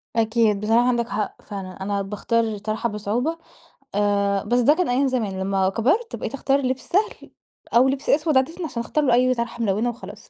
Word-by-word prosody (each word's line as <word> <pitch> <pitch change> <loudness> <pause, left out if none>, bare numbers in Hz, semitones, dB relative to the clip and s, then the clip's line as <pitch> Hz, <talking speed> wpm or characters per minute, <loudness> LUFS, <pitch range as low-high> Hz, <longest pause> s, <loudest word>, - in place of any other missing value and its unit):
أكيد 220 -2 +2
بصراحة 230 +3 +3
عندك 235 -2 0
حق 210 +1 -3
فعلًا، 190 -3 -7
أنا 200 0 -1
باختار 210 +4 0
الطرحة 215 +1 -2
بصعوبة 225 +10 -2 0.6
آآ 200 -1 +1
بس 240 +4 +1
ده 265 +5 +5
كان 360 -2 -1
أيام 265 +3 +2
زمان، 220 -7 -2
لما 190 0 +1
كبرت 285 - 0
بقيت - - -5
أختار 275 0 +1
لبس 260 0 -1
سهل 410 +5 -1 0.4
أو 250 +3 +6
لبس 270 +1 -2
أسود 300 -2 +3
عادةً 325 +7 0
عشان 235 -7 -4
اختار 300 +5 -1
له 245 - +3
أي 255 +1 +4
طرحة 235 0 -3
ملونة 215 +3 +1
وخلاص. 210 -2 -10
235 Hz, 185 wpm, -23 LUFS, 205-260 Hz, 0.6 s, أو